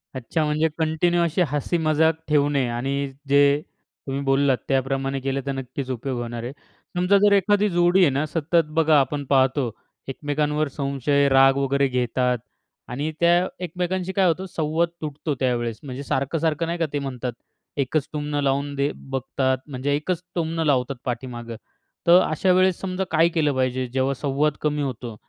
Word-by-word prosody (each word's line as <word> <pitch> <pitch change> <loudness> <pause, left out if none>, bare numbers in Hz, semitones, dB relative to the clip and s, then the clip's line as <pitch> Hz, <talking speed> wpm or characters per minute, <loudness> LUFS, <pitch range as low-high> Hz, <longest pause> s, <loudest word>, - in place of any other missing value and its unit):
अच्छा 130 +6 -1
म्हणजे 155 +2 +1
कंटिन्यू 165 +2 +1
अशी 170 +2 0
हसी 145 +4 -1
मजाक 155 +1 +3
ठेवणे 145 -3 +2
आणि 135 +4 -2
अ, 135 - -8 0.2
जे 140 +1 +4 0.5
तुम्ही 135 +1 -2
बोललात 135 -1 +2
त्याप्रमाणे 135 0 0
केलं 135 +1 -2
तर 140 - -1
नक्कीच 135 0 -5
उपयोग 125 +1 -3
होणार 120 -1 -5
आहे. 120 - -4 0.5
समजा 180 +3 +4
जर 205 +1 +4
एखादी 205 +1 +3
जोडी 175 +2 +3
आहे 175 - +6
ना 140 +3 0
सतत 165 +1 +1
बघा 155 -2 +5
आपण 145 +1 -1
पाहतो 130 -2 +2 0.4
एकमेकांवर 150 +2 -1
संशय, 140 0 0
राग 135 0 +5
वगैरे 140 0 +2
घेतात 125 0 0 0.5
आणि 145 +5 -2
त्या 175 +2 +4 0.2
एकमेकांशी 180 +2 -2
काय 190 -2 +3
होतं 175 +3 0
संवाद 160 +2 +1
तुटतो 150 -1 -3
त्यावेळेस. 120 -3 -1
म्हणजे 135 0 -6
सारखं-सारखं, 150 +4 -1
नाही 170 +1 -2
का, 165 - +2
ते 145 - 0
म्हणतात 130 -3 -4 0.4
एकच 140 +2 0
टुमणं 145 -1 -2
लावून 140 +1 0
दे 140 +1 0
बघतात. 130 0 -2
म्हणजे 140 0 -2
एकच 170 +4 -2
टुमणं 165 -1 -1
लावतात 135 -2 +1
पाठीमागं. 120 -2 -5 0.5
तर 175 +2 +8
अशा 170 +4 +1
वेळेस 185 -1 +3
समजा 190 0 -2
काय 165 +1 +4
केलं 150 -3 +2
पाहिजे 130 0 0
जेव्हा 135 +1 +1
संवाद 145 +1 +1
कमी 150 -1 0
होतो? 125 -4 -4
145 Hz, 165 wpm, -23 LUFS, 135-160 Hz, 0.5 s, तर